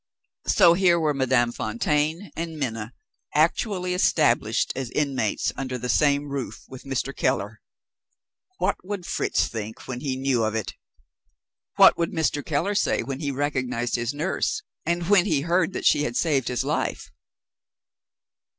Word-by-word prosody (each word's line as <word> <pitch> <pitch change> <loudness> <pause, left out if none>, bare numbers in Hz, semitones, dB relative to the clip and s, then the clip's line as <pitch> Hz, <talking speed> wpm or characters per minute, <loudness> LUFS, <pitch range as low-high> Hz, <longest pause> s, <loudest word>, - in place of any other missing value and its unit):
So 175 -4 +6
here 175 -1 +3
were 155 -2 +1
Madame 130 -3 +2
Fontaine 150 - -1
and 165 -1 -5
Minna 115 -4 -4 0.4
actually 180 +4 +1
established 180 - +2
as 130 -2 -4
inmates 135 -6 -1
under 130 -1 -4
the 125 +1 -5
same 145 +2 +2
roof 140 -3 -5
with 130 -1 -11
Mr. 135 0 -3
Keller! - - -1 1.0
What - - 0
would 190 -1 -5
Fritz - - 0
think, 110 -1 -7
when 125 -2 -4
he 135 -1 -2
knew 130 -3 +1
of 110 0 -1
it? 110 - -3 1.0
What - - +7
would 170 - 0
Mr. 150 -3 0
Keller 165 +7 -1
say 200 - +1
when 135 +2 -5
he 145 -3 -2
recognized 130 -4 -2
his 120 -1 -1
nurse, 155 +6 -2 0.2
and 170 0 0
when 200 -1 +4
he 150 -7 +1
heard 170 +3 +1
that - - -4
she - - +5
had 120 -5 -2
saved 140 -5 +1
his 125 - -1
life? 70 - -2
140 Hz, 150 wpm, -25 LUFS, 125-165 Hz, 1.0 s, What